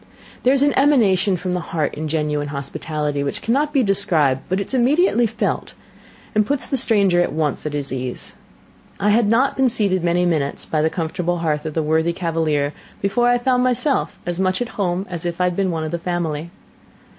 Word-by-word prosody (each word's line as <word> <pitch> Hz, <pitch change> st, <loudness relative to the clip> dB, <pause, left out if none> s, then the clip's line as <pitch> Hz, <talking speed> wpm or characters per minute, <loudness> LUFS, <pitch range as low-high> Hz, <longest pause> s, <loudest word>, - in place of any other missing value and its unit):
There 255 Hz, -, +3 dB
is 275 Hz, -, +4 dB
an 290 Hz, -, +3 dB
emanation 205 Hz, -9 st, +3 dB
from 180 Hz, +1 st, -3 dB
the 180 Hz, -, 0 dB
heart 165 Hz, -3 st, -2 dB
in 155 Hz, +1 st, -4 dB
genuine 150 Hz, -1 st, -1 dB
hospitality 145 Hz, +1 st, -3 dB
which 140 Hz, -, -2 dB
cannot 285 Hz, +6 st, +1 dB
be 275 Hz, -3 st, +2 dB
described, 165 Hz, -, +2 dB
but 185 Hz, +2 st, 0 dB
is 200 Hz, -, -5 dB
immediately 260 Hz, 0 st, +3 dB
felt, 225 Hz, -, -3 dB, 0.6 s
and 215 Hz, -, +3 dB
puts 280 Hz, +5 st, -2 dB
the -, -, -2 dB
stranger 200 Hz, -8 st, +3 dB
at -, -, 0 dB
once 150 Hz, -1 st, -1 dB
at 150 Hz, -, -4 dB
his 140 Hz, -2 st, -3 dB
ease. 125 Hz, -1 st, -3 dB, 0.7 s
I 205 Hz, +1 st, +2 dB
had 220 Hz, -1 st, +3 dB
not 255 Hz, +5 st, +2 dB
been 265 Hz, -1 st, +3 dB
seated 195 Hz, -6 st, 0 dB
many 175 Hz, +1 st, +2 dB
minutes 155 Hz, -5 st, -1 dB
by 155 Hz, -, 0 dB
the 160 Hz, -, +2 dB
comfortable 175 Hz, +1 st, -2 dB
hearth 150 Hz, 0 st, -1 dB
of 155 Hz, -, -6 dB
the 160 Hz, -, +1 dB
worthy 160 Hz, +2 st, +1 dB
cavalier 160 Hz, -4 st, -1 dB, 0.3 s
before 240 Hz, +5 st, +1 dB
I 245 Hz, 0 st, +4 dB
found 250 Hz, 0 st, +1 dB
myself 255 Hz, +2 st, 0 dB
as 175 Hz, 0 st, -3 dB
much 185 Hz, 0 st, +1 dB
at 245 Hz, -, -3 dB
home 185 Hz, -1 st, -2 dB
as 170 Hz, -3 st, -5 dB
if 175 Hz, 0 st, -3 dB
I -, -, +2 dB
had 180 Hz, -1 st, +1 dB
been 195 Hz, 0 st, 0 dB
one 165 Hz, -2 st, -2 dB
of 155 Hz, -, -4 dB
the 170 Hz, -, -2 dB
family. 170 Hz, -2 st, -3 dB
180 Hz, 205 wpm, -20 LUFS, 155-225 Hz, 0.7 s, is